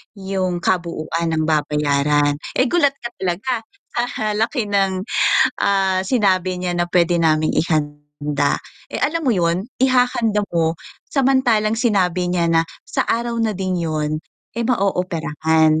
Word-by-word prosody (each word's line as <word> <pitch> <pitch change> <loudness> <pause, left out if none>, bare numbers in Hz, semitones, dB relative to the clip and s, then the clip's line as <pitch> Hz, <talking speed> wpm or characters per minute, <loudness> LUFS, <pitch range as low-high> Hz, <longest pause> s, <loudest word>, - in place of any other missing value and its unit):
yung 190 -3 -2
kabuuan 170 -2 -1
ng 155 - 0
babayaran, 145 -1 +1 0.2
eh 255 - +4
gulat 285 -4 +3
ka 235 -3 -7
talaga 190 +8 -1 0.4
sa 240 -3 -1
laki 225 0 -1
ng, 195 -2 +1 0.6
ah 190 -1 +2
sinabi 185 -4 +1
niya 180 -1 -2
na 175 - +2
pwede 175 -1 +3
naming 155 -1 +2
ihanda. 145 -2 -1 0.3
Eh - - -2
alam 330 +1 0
mo 260 - +3
yun, 175 -1 +1 0.2
ihahanda 245 -5 +2
mo 165 -1 +1 0.4
samantalang 250 -5 +3
sinabi 185 -6 +1
niya 175 -1 +1
na 165 - +5 0.2
sa - - -2
araw 235 0 0
na 220 -4 0
din 185 -2 -2
yun 155 -2 -2 0.3
eh 235 - -4
ma-ooperahan. 160 -7 +1
185 Hz, 135 wpm, -20 LUFS, 160-215 Hz, 0.6 s, na